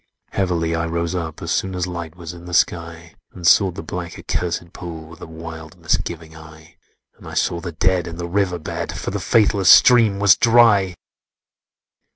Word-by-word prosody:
"Heavily 85 -4 -1
I 80 0 -1
rose 85 +1 -2
up, 85 -3 -5
as - - -3
soon 95 -1 -1
As 90 -1 -1
light 85 -2 -7
was 85 -1 -8
in 85 0 -12
the 90 -1 -4
sky, 85 -1 -1 0.2
And 90 -2 -9
sought 95 0 +4
the - - -7
black 85 +1 -6
accursèd 85 0 -4
pool 80 -2 -8
With 85 0 -14
a - - -8
wild 80 -1 -10
misgiving 80 -1 -3
eye: 80 +1 -15 0.4
And - - -13
I - - -8
saw 85 - 0
the 85 0 -6
Dead 90 +2 +1
in 85 0 -7
the 85 0 -5
river 90 0 0
bed, 80 - -5
For - - -4
the - - -3
faithless 105 -4 +2
stream 115 -5 +6
was 100 -2 +5
dry. 115 -6 +4
85 Hz, 190 wpm, -20 LUFS, 80-95 Hz, 0.4 s, stream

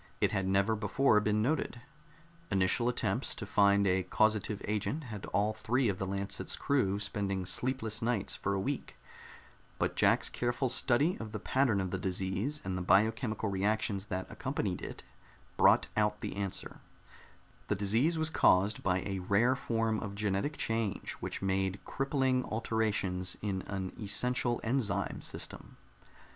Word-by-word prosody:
It - - +2
had 95 -1 0
never 100 +3 +2
before 110 +2 +3
been 105 0 +1
noted. 130 -2 -1 0.7
Initial 95 +5 +2
attempts 125 - 0
to - - -5
find 100 0 +4
a 95 0 +3
causative 105 +2 +1
agent 105 +9 -1
had 105 -6 -7
all 105 +2 +1
three 120 +3 +1
of 95 - -2
the 95 - -2
Lancet's 100 +1 -2
crew 120 -9 +1
spending 100 -2 -2
sleepless 115 0 -1
nights 115 -4 0
for 100 - -1
a - - 0
week, 135 +7 -3 0.8
but - - -1
Jack's - - +4
careful 120 +2 -1
study 130 +7 +2
of 110 -2 -7
the 105 - -3
pattern 130 -5 +2
of 95 -2 -2
the 95 - -2
disease 95 +10 -2
and 95 -1 -3
the 90 - -2
biochemical 110 +4 +2
reactions 100 0 -1
that 95 -2 -3
accompanied - - -3
it - - -7 0.5
brought - - +5
out 105 0 +1
the - - -4
answer: 100 -2 -4 0.9
the 105 - +1
disease 115 - +2
was 160 0 0
caused 100 - +3
by 90 -1 +1
a 95 +1 -3
rare 100 +8 +3
form 115 -4 0
of 100 -1 -5
genetic 105 +7 -1
change 115 -3 -1
which - - -5
made 95 0 0
crippling 135 -2 0
alterations 105 -5 -1
in 95 -2 -1
an 95 -2 -4
essential 120 +4 +1
enzyme 110 -5 -1
system. - - -7
105 Hz, 155 wpm, -32 LUFS, 95-120 Hz, 0.9 s, brought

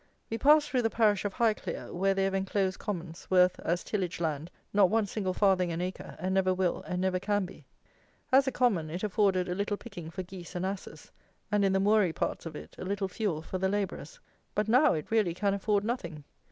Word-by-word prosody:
We 225 - -2
passed 295 +1 +6
through 255 -4 +1
the 225 - +1
parish 210 -4 +2
of 205 - -2
Highclere, 230 -3 -1
where 195 +2 +1
they 195 - +1
have 195 0 0
enclosed 195 0 0
commons, 175 -4 -5
worth, 180 -1 +4
as 175 +1 -1
tillage 185 -6 -2
land, 160 -1 -2 0.2
not 200 -2 +5
one 220 0 +2
single 190 -2 -2
farthing 185 -3 +3
an 165 - -3
acre, 180 +1 -5
and 185 +3 -2
never 185 -1 +2
will 185 -2 0
and 180 -1 -2
never 185 0 +1
can 205 0 0
be. 180 - -13 0.6
As 265 +1 +5
a - - +2
common 205 -13 +1
it 175 +5 -5
afforded 195 -3 +2
a 180 - -1
little 200 +2 -1
picking 180 -9 -9
for 185 +3 -5
geese 180 0 -10
and 180 +1 -1
asses, 195 0 -6 0.4
and 210 -1 +3
in 195 - +3
the 190 - +3
moory 200 -4 +3
parts - - -2
of 155 - -8
it, - - -9
a - - -5
little 195 +1 -1
fuel 185 -5 -2
for 185 +3 -4
the 190 +1 +1
labourers. 205 - -3 0.4
But 210 0 +1
now 250 - +5
it 155 +5 -5
really 210 -7 +2
can 200 +1 +1
afford 200 0 +1
nothing. 170 - -4
195 Hz, 220 wpm, -30 LUFS, 180-210 Hz, 0.6 s, passed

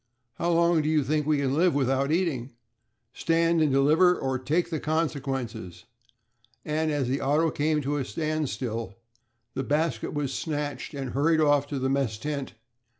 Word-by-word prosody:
"How 170 - 0
long 170 -1 +3
do 150 - -1
you 155 -2 +2
think 150 +2 0
we 155 -1 +3
can 135 -2 0
live 170 +1 +3
without 135 +1 +1
eating?" 155 -8 -1 0.6
"Stand 165 0 +2
and 155 -2 +3
deliver 155 +7 +4
or 130 -1 -2
take 155 +8 0
the 160 - -1
consequences" 135 - -3 0.8
and 155 +1 0
as 145 -4 0
the 135 +3 -1
auto 150 +4 +2
came 150 0 0
to 145 +2 -1
a 140 - -1
standstill, 125 - -3 0.6
the 135 - -2
basket 150 +4 -1
was 140 -2 -2
snatched 145 +1 -4
and 135 -3 -4
hurried 155 +4 +2
off 145 -2 +3
to 145 - -4
the 130 0 -1
mess 135 -5 0
tent. 140 +2 -4
145 Hz, 165 wpm, -27 LUFS, 135-155 Hz, 0.8 s, deliver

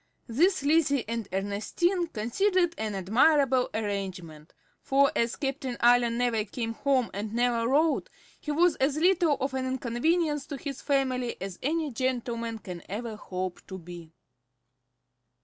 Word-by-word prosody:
This 330 - +2
Lizzie 285 -3 +2
and 230 -2 -3
Ernestine 215 - 0
considered 345 - +1
an 215 -2 -2
admirable 255 - +3
arrangement; 185 -7 -4 0.3
for, 275 +1 +3
as 235 0 +1
Captain 270 -3 -3
Allen 240 -1 +4
never 240 -3 +1
came 225 +2 -4
home 260 -1 +1
and 210 +2 -4
never 235 -1 +1
wrote, 310 - +2 0.3
he - - -8
was 330 +3 +3
as 275 +2 +1
little 340 -3 +3
of 270 0 -2
an 260 0 -2
inconvenience 285 +5 0
to 290 -2 -5
his 275 -1 -6
family 260 -4 0
as 190 -1 -6
any 310 +1 -1
gentleman 235 -2 -2
can 180 -5 -8
ever 220 +3 -4
hope 185 -3 -5
to 190 - -7
be. 170 -2 -10
245 Hz, 140 wpm, -28 LUFS, 215-290 Hz, 0.3 s, Allen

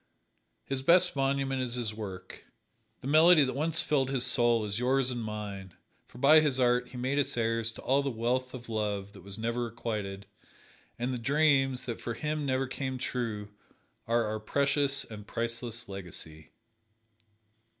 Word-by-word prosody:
His 135 -1 -2
best 175 +5 +4
monument 135 -1 0
is 125 -1 -3
his 115 -4 -2
work. 100 -4 -8 0.6
The 130 - -6
melody 155 +2 +7
that 130 - -1
once 160 +4 0
filled 135 -3 +1
his 135 -2 +1
soul 120 -3 +3
is 105 +2 -2
yours 130 +1 +2
and 120 -2 -3
mine; 100 -4 -6 0.3
for - - -15
by 145 +5 +7
his 145 -4 +1
art 125 0 +3
he 125 - -10
made 130 +3 0
us 140 - 0
heirs 115 0 0
to - - -11
all 135 +2 +3
that 140 - -1
wealth 125 +2 -1
of 125 -1 -10
love 105 -3 -2
that - - -13
was 100 +1 -7
never 115 +2 -1
requited, 105 -4 -4 0.7
and 125 +2 -2
the 125 - -3
dreams, 135 0 +2
that 115 - -5
for 120 - -4
him 150 +1 -2
never 130 0 +1
came 130 0 -4
true, 115 -5 -3 0.6
are 115 0 +2
our 110 0 -3
precious 140 +4 +1
and 105 -2 -10
priceless 115 0 -3
legacy. 85 -5 -8
125 Hz, 170 wpm, -30 LUFS, 110-135 Hz, 0.7 s, melody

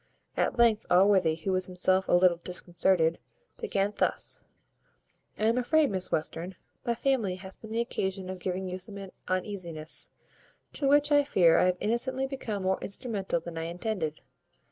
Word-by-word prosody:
At - - 0
length 230 -3 +3
Allworthy, 185 -3 +4
who 180 +4 -3
was 185 -1 +1
himself 185 +1 +2
a - - +1
little 175 -1 +5
disconcerted, 175 -1 +1 0.4
began 200 +1 -1
thus: - - -1 1.0
"I - - -3
am 230 +3 +3
afraid, 300 +2 +3
Miss 185 -2 -1
Western, 170 +4 -2 0.3
my 235 - 0
family 230 -8 0
hath 190 0 -12
been 220 - -10
the 225 +1 0
occasion 190 -4 -3
of 185 0 -6
giving 185 +1 -3
you 185 0 -4
some 195 0 -7 0.2
uneasiness; 180 -4 -2 0.6
to 280 - -1
which, 290 +1 +4
I 290 0 +6
fear, 180 - +4
I - - +4
have 180 0 +2
innocently 260 +4 0
become 235 -7 -4
more 190 0 0
instrumental 200 -5 -2
than 165 -1 -6
I 165 - -3
intended. 170 -3 -3
190 Hz, 165 wpm, -29 LUFS, 180-225 Hz, 1.0 s, I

